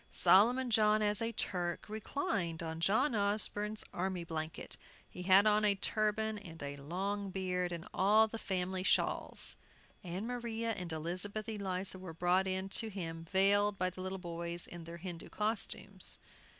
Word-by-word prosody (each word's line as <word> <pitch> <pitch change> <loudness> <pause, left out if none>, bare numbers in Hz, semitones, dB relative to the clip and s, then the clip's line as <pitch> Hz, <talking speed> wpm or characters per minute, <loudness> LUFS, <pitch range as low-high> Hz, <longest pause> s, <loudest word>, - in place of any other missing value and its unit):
Solomon 235 +8 +4
John, 215 -1 +4
as 210 0 +2
a 230 0 0
Turk, 175 -5 -2
reclined 200 - -2
on 160 0 -4
John 215 - +3
Osborne's 210 0 +1
army 185 -1 -2
blanket. 160 -1 -5 0.3
He 180 - -9
had 190 +2 +6
on 215 0 +4
a 205 -1 +4
turban, 215 +1 0
and 165 -6 -9
a 140 0 -4
long 195 +7 -3
beard, 180 -1 -1
and 170 -1 -5
all 215 +3 +5
the 225 +1 -6
family 185 -1 -2
shawls. 185 - +1 0.5
Ann 185 +3 -4
Maria 230 -2 -2
and 180 -6 -4
Elizabeth 180 +7 -2
Eliza 190 -3 -3
were 180 -3 -8
brought 180 +3 +2
in 190 0 -1
to 220 +3 +1
him, 165 -4 -6
veiled, 200 +1 +4
by 185 0 +1
the 185 - -9
little 190 +1 -3
boys 170 -1 -5
in 170 -1 -9
their 170 +1 -8
Hindoo 170 -1 -7
costumes. 210 -2 -2
190 Hz, 160 wpm, -34 LUFS, 175-210 Hz, 0.5 s, had